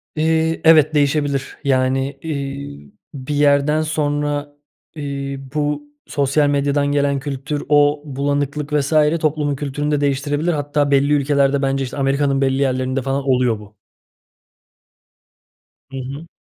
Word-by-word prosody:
İii, 160 +1 +1
evet, 155 -2 +6
değişebilir. 145 -1 0
Yani, 135 0 0
iii, 140 - -6 0.2
bir 140 +1 -5
yerden 145 +1 +3
sonra, 145 -1 -2 0.4
iii, 140 -2 -4
bu 150 -1 -1 0.3
sosyal 145 +1 +1
medyadan 145 0 +1
gelen 140 -1 +1
kültür, 145 +1 -4
o 145 0 +4
bulanıklık 145 +1 -2
vs. 145 +1 0 0.3
toplumun 150 -2 0
kültürünü 145 +1 -3
de 145 - +1
değiştirebilir. 145 +4 0
Hatta 145 -1 0
belli 140 +1 +3
ülkelerde 140 -1 +2
bence, 135 0 0
işte, 130 - -6
Amerika'nın 140 0 +1
belli 135 0 +1
yerlerinde 130 0 0
falan 135 +2 -2
oluyor 125 -4 +2
bu. 105 0 -15 2.2
Hı 135 - -6
hı. 140 +5 -7
140 Hz, 125 wpm, -19 LUFS, 135-150 Hz, 2.2 s, evet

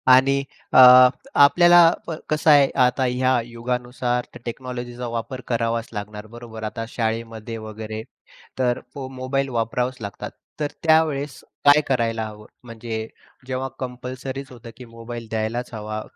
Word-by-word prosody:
आणि 135 +2 +5 0.3
अ, - - +7 0.6
आपल्याला 175 +3 +7 0.4
कसं 155 +1 +1
आहे 145 -2 +6 0.2
आता 125 +2 0
ह्या 130 0 +2
युगानुसार 125 +1 -3
त्या - - -12
टेक्नॉलॉजीचा 125 0 -6
वापर 115 +3 -5
करावाच 115 -1 -1
लागणार, 105 0 -7
बरोबर. 115 -1 -10
आता 115 +1 -4
शाळेमध्ये 115 -1 -4
वगैरे 110 0 -7 0.6
तर 125 -1 +1 0.2
मोबाईल 135 0 -3
वापरावाच 125 +2 -1
लागतात. 100 -2 -6 0.3
तर 150 -1 -2
त्यावेळेस 155 -3 +2 0.3
काय 145 +1 +7
करायला 115 -4 0
हवं? 105 0 -12 0.2
म्हणजे 115 -1 -6 0.4
जेव्हा 130 0 -2
कंपल्सरीच 130 +2 -6
होतं 120 -1 -11
की 125 - -10
मोबाईल 115 0 -9
द्यायलाच 110 +3 -3
हवा 110 0 -5
120 Hz, 125 wpm, -22 LUFS, 115-130 Hz, 0.6 s, अ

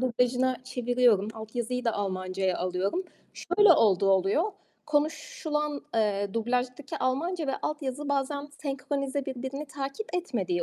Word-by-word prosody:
dublajına 250 +1 +2
çeviriyorum. 245 -5 +3
Altyazıyı 240 +3 -3
da 230 - +2
Almancaya 185 -2 -1
alıyorum. 185 - 0 0.3
Şöyle 365 +1 +5
olduğu 195 - +4
oluyor: 195 - +3 0.4
Konuşulan, 300 -1 -1
eee, 205 -2 +1
dublajdaki 250 +4 -1
Almanca 310 +6 0
ve 270 - 0
altyazı 290 -1 -3
bazen 285 +1 -1
senkronize 275 0 -2
birbirini 265 +3 -4
takip 280 +8 -4
etmediği 200 - -1
255 Hz, 115 wpm, -28 LUFS, 220-290 Hz, 0.4 s, Şöyle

